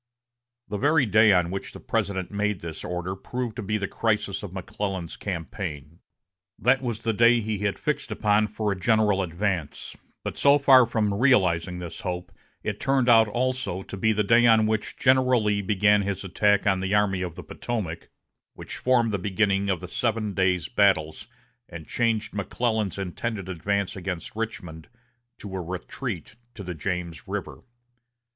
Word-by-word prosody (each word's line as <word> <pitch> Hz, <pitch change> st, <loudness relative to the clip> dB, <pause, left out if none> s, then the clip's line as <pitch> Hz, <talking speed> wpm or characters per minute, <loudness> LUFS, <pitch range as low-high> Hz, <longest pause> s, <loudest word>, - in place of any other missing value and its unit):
The 105 Hz, -1 st, -4 dB
very 145 Hz, 0 st, +3 dB
day 110 Hz, 0 st, +5 dB
on 90 Hz, -2 st, +3 dB
which 95 Hz, -, -5 dB
the -, -, -9 dB
President 95 Hz, -2 st, -2 dB
made 105 Hz, -1 st, -1 dB
this 80 Hz, -2 st, -7 dB
order 90 Hz, +1 st, -3 dB
proved 120 Hz, +3 st, -5 dB
to -, -, -3 dB
be 105 Hz, +1 st, -1 dB
the 100 Hz, -2 st, -2 dB
crisis 105 Hz, -3 st, -1 dB
of 105 Hz, -, -7 dB
McClellan's 95 Hz, -2 st, -4 dB
campaign. 85 Hz, -4 st, -6 dB, 0.6 s
That 125 Hz, +5 st, +3 dB
was 120 Hz, -4 st, -3 dB
the 115 Hz, -, 0 dB
day 120 Hz, +2 st, +5 dB
he 110 Hz, -2 st, -3 dB
had 100 Hz, -1 st, -1 dB
fixed 150 Hz, -, -2 dB
upon 105 Hz, 0 st, +2 dB
for 105 Hz, 0 st, -2 dB
a -, -, -1 dB
general 105 Hz, +1 st, +2 dB
advance; 85 Hz, -3 st, -3 dB, 0.3 s
but -, -, -5 dB
so 140 Hz, +1 st, +6 dB
far 130 Hz, -4 st, +6 dB
from 110 Hz, -3 st, 0 dB
realizing 95 Hz, -7 st, +2 dB
this 90 Hz, -1 st, -7 dB
hope, 90 Hz, -1 st, -4 dB, 0.3 s
it -, -, -3 dB
turned 135 Hz, -2 st, +2 dB
out, 110 Hz, -2 st, +7 dB
also, 125 Hz, -4 st, -2 dB
to -, -, -8 dB
be 110 Hz, +3 st, +2 dB
the 105 Hz, 0 st, +1 dB
day 115 Hz, +3 st, +5 dB
on 110 Hz, -1 st, +5 dB
which 110 Hz, -1 st, -2 dB
General 130 Hz, -3 st, +3 dB
Lee 105 Hz, -1 st, +1 dB
began 105 Hz, +1 st, +3 dB
his 100 Hz, -1 st, -3 dB
attack 100 Hz, +2 st, +2 dB
on 95 Hz, -2 st, +2 dB
the 95 Hz, +2 st, 0 dB
Army 100 Hz, -3 st, +2 dB
of 90 Hz, -3 st, -4 dB
the -, -, -8 dB
Potomac, 95 Hz, -9 st, -5 dB, 0.5 s
which -, -, -7 dB
formed 120 Hz, -3 st, +2 dB
the 100 Hz, -, -1 dB
beginning 100 Hz, +1 st, +1 dB
of 95 Hz, -2 st, 0 dB
the 90 Hz, -, -6 dB
seven 110 Hz, +1 st, -1 dB
days' 90 Hz, -2 st, +1 dB
battles, 100 Hz, -5 st, +1 dB, 0.4 s
and 85 Hz, -3 st, -9 dB
changed 115 Hz, -3 st, 0 dB
McClellan's 105 Hz, 0 st, -1 dB
intended 100 Hz, +1 st, -4 dB
advance 100 Hz, +2 st, -2 dB
against 90 Hz, -1 st, -5 dB
Richmond 90 Hz, -8 st, -5 dB, 0.5 s
to 100 Hz, -2 st, -8 dB
a 95 Hz, -, -2 dB
retreat 90 Hz, -, -6 dB, 0.2 s
to 100 Hz, -, -7 dB
the 90 Hz, -1 st, -5 dB
James 85 Hz, -1 st, -4 dB
River. -, -, -5 dB
100 Hz, 170 wpm, -25 LUFS, 90-110 Hz, 0.6 s, out